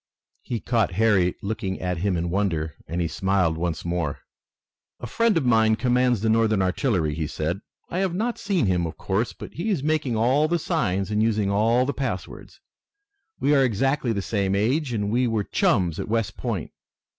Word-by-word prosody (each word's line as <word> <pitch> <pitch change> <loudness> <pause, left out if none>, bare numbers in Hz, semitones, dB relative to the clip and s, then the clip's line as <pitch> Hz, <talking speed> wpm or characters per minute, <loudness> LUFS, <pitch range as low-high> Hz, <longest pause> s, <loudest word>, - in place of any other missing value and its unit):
He 120 - -4
caught 115 -6 0
Harry 95 -3 +3
looking 100 -2 -3
at 90 -2 -2
him 95 0 0
in 85 +1 -2
wonder, 85 -6 -1
and 85 - -3
he 85 - +1
smiled 95 -2 +1
once 85 -1 -3
more. 85 -4 -2 0.8
"A - - -6
friend 230 -5 +2
of 150 - 0
mine 110 -2 +4
commands 125 -1 +2
the 110 - 0
Northern 110 -2 +3
artillery," 90 - 0
he 80 0 -2
said. 80 +5 -3 0.3
"I 180 - -3
have 190 -3 0
not 230 +5 -1
seen 190 - 0
him, 90 -3 +1
of 80 -1 -8
course, 100 +5 -1
but - - -10
he 175 +7 -3
is 175 -10 0
making 150 -5 0
all 130 +7 +3
the 170 +2 +1
signs 100 - -1
and 105 0 +1
using 105 -3 +1
all 115 +5 +3
the 140 - -1
passwords. 115 -9 -5 0.8
We 145 - +2
are 135 -2 +5
exactly 130 +2 +1
the 100 -3 -2
same 100 -2 0
age, 125 +8 +1
and 105 -3 -1
we 125 +2 +2
were 110 -3 0
chums 90 -4 +1
at - - -4
West 115 -2 -1
Point. - - -4
110 Hz, 190 wpm, -24 LUFS, 90-125 Hz, 0.8 s, are